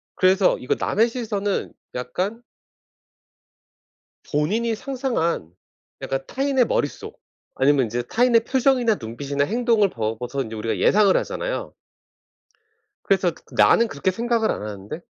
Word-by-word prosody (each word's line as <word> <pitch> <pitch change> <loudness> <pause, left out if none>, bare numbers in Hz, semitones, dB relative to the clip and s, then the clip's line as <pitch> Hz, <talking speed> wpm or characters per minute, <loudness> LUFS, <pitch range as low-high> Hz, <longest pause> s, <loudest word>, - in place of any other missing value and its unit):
그래서 185 0 +3
이거 125 - -1
남의 225 +4 +2
시선은 205 -5 -2 0.2
약간 180 - -3 1.9
본인이 215 +10 0
상상한 225 - -2 0.5
약간 135 0 -2
타인의 270 -2 +1
머릿속 145 - -3 0.4
아니면 135 -1 +3
인제 120 +2 -2
타인의 230 - +3
표정이나 255 -4 +2
눈빛이나 140 +4 -3
행동을 225 - +2
보고서 120 +3 -3
인제 110 -2 -7
우리가 110 +1 -2
예상을 200 -2 +4
하잖아요. - - -4 1.3
그래서 190 -3 +2 0.2
나는 235 - +5
그렇게 145 +7 -1
생각을 230 +2 0
안 - - -3
하는데 105 - -7
190 Hz, 295 characters per minute, -23 LUFS, -, 1.9 s, 나는